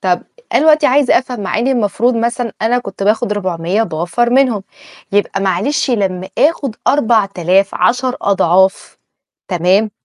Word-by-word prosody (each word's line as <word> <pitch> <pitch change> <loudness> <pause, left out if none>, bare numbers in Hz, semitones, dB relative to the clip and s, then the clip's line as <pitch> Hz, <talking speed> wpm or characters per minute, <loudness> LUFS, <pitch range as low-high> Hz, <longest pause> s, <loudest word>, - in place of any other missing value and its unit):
طب 185 -3 0 0.3
أنا - - +3
دلوقتي 310 -1 +4
عايزة 270 0 +3
أفهم 250 -2 -6
مع 200 +1 -2
إني 255 +4 +1
المفروض 235 +1 0
مثلًا 235 0 -2
أنا 245 +2 +2
كنت 195 -4 -7
باخد 215 +2 +1
400 185 0 -1
وباوفّر 175 +6 -1
منهم. 250 -6 +2 0.5
يبقى 200 -1 0
معلش 200 +10 0
لمّا 190 -5 -2
آخد 280 -7 +1
4000، 200 - +1
10 250 +1 0
أضعاف. 190 -1 +1 0.5
تمام؟ 190 +4 +1
210 Hz, 135 wpm, -15 LUFS, 190-245 Hz, 0.5 s, دلوقتي